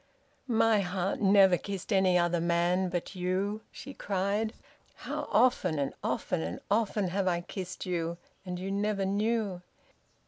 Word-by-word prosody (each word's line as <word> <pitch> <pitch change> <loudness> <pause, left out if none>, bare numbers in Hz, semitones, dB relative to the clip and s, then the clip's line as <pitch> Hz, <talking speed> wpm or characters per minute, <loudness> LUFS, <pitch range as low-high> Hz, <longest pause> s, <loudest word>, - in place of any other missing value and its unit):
"My 225 -2 +4
heart 190 0 -1
never 195 -2 +6
kissed 200 +1 -4
any 190 -2 +4
other 175 -1 +2
man 175 +2 +2
but 175 +2 -3
you!" 190 +4 -1
she 275 - -9
cried. 205 +1 -1 0.4
"How - - -5
often 190 -10 +3
and 140 -1 -1
often - - -1
and 80 +2 -4
often 205 -3 +1
have 190 +1 -1
I 175 -1 +1
kissed 180 0 -6
you, 170 -2 -2 0.3
and 180 -2 -5
you 190 +2 -4
never 200 0 0
knew! 205 -1 0
190 Hz, 145 wpm, -30 LUFS, 180-205 Hz, 0.4 s, never